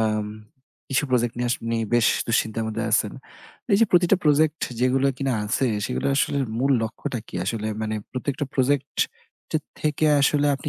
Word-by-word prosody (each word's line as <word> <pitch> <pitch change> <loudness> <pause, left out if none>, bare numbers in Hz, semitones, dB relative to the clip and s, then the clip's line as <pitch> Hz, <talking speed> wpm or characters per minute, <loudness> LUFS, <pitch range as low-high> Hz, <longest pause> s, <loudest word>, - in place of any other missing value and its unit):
এাম 110 -1 0 0.7
কিছু 140 - +2
প্রজেক্ট 120 -2 +1
নিয়ে 120 0 0
আপনি 115 -1 -2 0.2
বেশ 120 -1 +4 0.2
দুশ্চিন্তার 110 -1 0
মধ্যে 110 +1 -3
আছেন। 105 -1 +2 0.6
এই 195 - +7
যে 230 - +7
প্রতিটা 175 +2 +5
প্রজেক্ট 155 +1 +3 0.2
যেগুলো 130 +2 +3
কিনা 135 0 -1
আছে। 120 +5 0 0.2
সেগুলো 65 - -2
আসলে 140 - +1 0.2
মূল 135 +3 +1
লক্ষ্যটা 120 +3 -4
কি? - - -14
আসলে 110 +2 -2 0.2
মানে 110 0 -2 0.2
প্রত্যেকটা 135 +2 -3
প্রজেক্ট 140 +1 +1 0.5
টের 155 -1 0 0.2
থেকে 155 0 +1
আসলে 145 +1 +3
আপনি 145 - -5
130 Hz, 165 wpm, -24 LUFS, 115-145 Hz, 0.7 s, এই